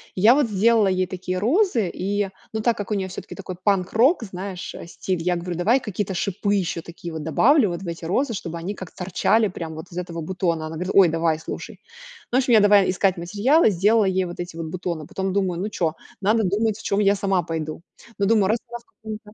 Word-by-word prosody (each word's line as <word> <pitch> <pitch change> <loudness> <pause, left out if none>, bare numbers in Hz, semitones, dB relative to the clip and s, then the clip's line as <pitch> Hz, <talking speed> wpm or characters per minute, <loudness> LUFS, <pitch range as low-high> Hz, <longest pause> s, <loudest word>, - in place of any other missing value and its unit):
Я 220 +7 +6
вот 290 -4 +2
сделала 215 +1 +3
ей 185 -1 +1
такие 185 0 -4
розы, 245 - +2
и, 200 +1 -1 0.2
но 220 - -1
так 235 +1 +1
как 205 +1 -5
у - - +2
неё 195 -2 -1
всё-таки 185 - -8
такой 185 -2 -7
панк-рок, 215 - +3
знаешь, 190 -2 -6
а, - - -8
стиль, 175 0 -3
я 180 0 +1
говорю: 175 0 -4
"Давай 220 +9 +3
какие-то 205 -5 -3
шипы 200 +3 -1
ещё 180 -4 -1
такие 170 0 -8
вот 160 -1 -5
добавлю 235 - +4
вот 175 +1 -4
в 190 - -7
эти 170 0 -5
розы, 235 - 0
чтобы 170 -4 -5
они 195 +5 -4
как 185 -3 -9
торчали 190 +4 +1
прям 165 -4 -6
вот 160 +3 -8
из 170 - -9
этого 170 -2 -4
бутона". 165 -2 -1
Она 160 - -7
говорит: 180 +4 -3
"Ой, 195 -2 +7
давай, 165 -1 0
слушай". - - -7 0.5
Ну, 245 - +3
в 265 - +5
общем, 250 -2 +1
я 220 - +8
давай 205 -1 +5
искать 190 0 +1
материалы, 210 - +3
сделала 205 +4 +3
ей 190 -1 +1
вот 175 - -8
эти 175 -1 -6
вот 165 -1 -5
бутоны, 170 -2 -4
потом 190 0 -3
думаю: 185 -4 0
"Ну 205 +4 -2
чё, 165 -6 -1 0.3
надо 215 +3 +2
думать, 210 +3 0
в - - -12
чём 200 - 0
я 200 -1 +4
сама 195 -2 +1
пойду". 160 -1 -5 0.4
Ну, 200 - +2
думаю, 215 -4 +3
раскрас 235 +1 -3
как 375 - -37
у 220 - -9
меня 215 0 -4
190 Hz, 235 wpm, -23 LUFS, 175-215 Hz, 0.5 s, я